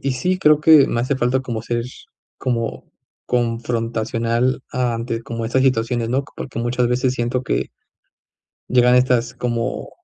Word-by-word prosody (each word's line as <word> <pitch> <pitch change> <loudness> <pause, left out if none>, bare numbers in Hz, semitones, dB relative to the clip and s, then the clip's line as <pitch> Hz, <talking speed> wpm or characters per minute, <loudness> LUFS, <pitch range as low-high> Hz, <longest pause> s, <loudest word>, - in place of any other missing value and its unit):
y 135 - +2
sí, 180 +9 -1
creo 150 -4 +4
que 155 -3 +7
me 120 - -1
hace 130 +3 0
falta 130 +1 +1
como 120 -4 -5
ser 120 0 -2 0.5
como 115 -3 -2 0.4
confrontacional 115 +1 -1
ante 115 -2 -2
como 115 -1 -4
estas 130 +3 +1
situaciones, 115 -2 +1
¿no? 135 +2 0
Porque 130 - -6
muchas 120 +1 0
veces 125 +1 +1
siento 125 +1 -1
que - - -2 1.0
llegan 125 0 +4
estas 125 -1 +2
como 120 -2 -3
125 Hz, 145 wpm, -20 LUFS, 115-130 Hz, 1.0 s, que